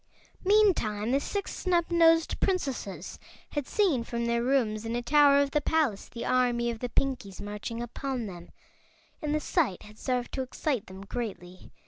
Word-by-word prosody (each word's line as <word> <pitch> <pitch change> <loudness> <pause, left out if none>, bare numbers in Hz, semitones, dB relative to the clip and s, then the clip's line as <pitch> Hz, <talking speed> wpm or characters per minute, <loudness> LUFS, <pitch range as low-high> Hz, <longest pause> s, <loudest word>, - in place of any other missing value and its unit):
Meantime 360 - +3
the 275 - +3
Six 400 +7 -3
Snubnosed 335 -2 +3
Princesses 275 - -2 0.3
had 290 -3 -3
seen 355 - +2
from 235 0 -3
their 235 0 +1
rooms 235 -4 +1
in 225 +1 -3
a 240 - -1
tower 285 +2 +6
of 280 -1 +2
the 300 - +1
palace 290 -11 0
the 235 - -6
army 245 -2 +2
of 230 - -7
the 245 - -3
Pinkies 250 -8 -2
marching 210 +3 -5
upon 250 0 -4
them, 175 -4 -9 0.7
and 300 -1 0
the - - +2
sight 300 - 0
had 210 0 -14
served 250 -1 -1
to 265 - -2
excite 260 -2 -2
them 190 +1 -10
greatly. 190 -6 -6
250 Hz, 165 wpm, -28 LUFS, 225-300 Hz, 0.7 s, tower